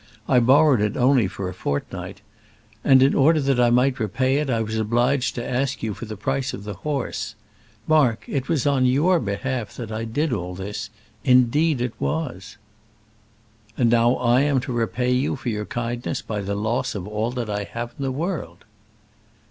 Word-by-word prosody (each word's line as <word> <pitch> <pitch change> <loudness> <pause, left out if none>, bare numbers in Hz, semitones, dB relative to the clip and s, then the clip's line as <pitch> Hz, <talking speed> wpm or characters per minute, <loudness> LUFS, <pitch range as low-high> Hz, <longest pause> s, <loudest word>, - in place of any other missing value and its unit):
I 125 - +5
borrowed 130 0 +5
it 105 0 0
only 125 -4 +4
for 95 0 -5
a 90 - -5
fortnight; 80 -6 -4 0.6
and 130 -2 +6
in 135 - +4
order 155 +3 +4
that 135 -3 +1
I 120 -1 +5
might 125 +2 +2
repay 130 +5 +1
it, 150 -1 -1
I 115 -3 +1
was 110 0 -4
obliged 120 +4 +1
to 120 - -4
ask 130 0 -1
you 110 -2 -1
for 115 - -8
the 110 -1 -7
price 135 +5 -2
of 100 - -10
the 105 0 -5
horse. 135 +1 -4 0.5
Mark, 140 -8 +3
it 135 -2 -3
was 155 -7 +1
on 135 -3 +3
your 160 +8 +3
behalf 110 0 -3
that 115 -3 -6
I 110 +1 -3
did 145 +5 -1
all 90 -4 -4
this, 105 +3 -5 0.3
indeed 130 +3 +3
it 125 -2 -2
was." 130 - -3 1.2
"And 120 -2 +3
now 120 +1 +4
I 125 +1 +3
am 140 -2 +2
to 125 -1 -5
repay 120 +2 0
you 125 +2 +1
for 130 - -4
your 105 -2 -3
kindness 120 +1 -3
by 105 -2 -3
the 100 +1 -3
loss 110 +4 -1
of 95 -1 -5
all 105 +2 -2
that 120 -3 -3
I 105 -1 -3
have 120 +2 -6
in - - -3
the 135 - -1
world." 140 - -4
120 Hz, 190 wpm, -23 LUFS, 110-135 Hz, 1.2 s, and